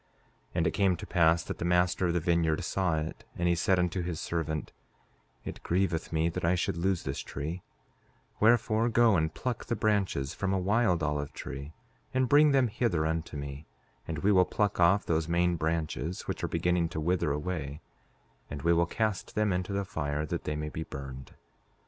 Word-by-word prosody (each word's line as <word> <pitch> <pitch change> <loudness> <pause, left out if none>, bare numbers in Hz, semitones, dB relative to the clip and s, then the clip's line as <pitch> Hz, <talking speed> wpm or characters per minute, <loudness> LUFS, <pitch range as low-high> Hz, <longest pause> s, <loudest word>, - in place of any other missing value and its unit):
5:7 - - -39 0.5
And 80 -2 +2
it 80 - +2
came 95 -1 +2
to - - -8
pass 85 -2 +3
that - - -6
the - - -2
master 90 +1 +2
of 85 - 0
the - - +3
vineyard 85 -2 +1
saw 90 -4 0
it, 80 +1 -4
and 85 - 0
he 85 - +4
said 90 +2 +2
unto 90 +1 0
his 85 -2 -3
servant: 80 -2 -3 0.7
It - - -6
grieveth 85 -2 0
me 80 0 +1
that 85 - -4
I 85 +2 +3
should 85 - -1
lose 90 +1 0
this 70 +1 -3
tree; 80 +6 -5 0.8
wherefore, 110 0 +3
go 115 -2 +4
and 80 -2 +1
pluck 120 +8 -4
the 120 - -1
branches 95 -11 0
from 95 -1 -1
a - - +2
wild 95 -2 +2
olive 75 -1 -2
tree, 70 +3 -7 0.4
and 130 -1 +3
bring 150 +3 +6
them 135 -3 +4
hither 105 -8 0
unto 80 -1 -2
me; 70 +1 -7 0.4
and 80 - -3
we 105 - +4
will 95 -2 +6
pluck 105 +2 -1
off 90 +4 +4
those 80 0 0
main 85 +1 +2
branches 80 0 -2
which - - -5
are - - +1
beginning 85 0 +1
to 80 - -4
wither 85 -1 +1
away, 75 -1 -3 0.7
and 70 -1 -6
we 85 - +4
will 85 0 +3
cast 110 0 -2
them 105 -2 +2
into 90 +2 -2
the 100 0 -1
fire 75 -3 -2
that - - -4
they 75 - -1
may 75 0 -3
be 80 - -5
burned. 65 -3 -8
85 Hz, 200 wpm, -29 LUFS, 80-95 Hz, 0.8 s, bring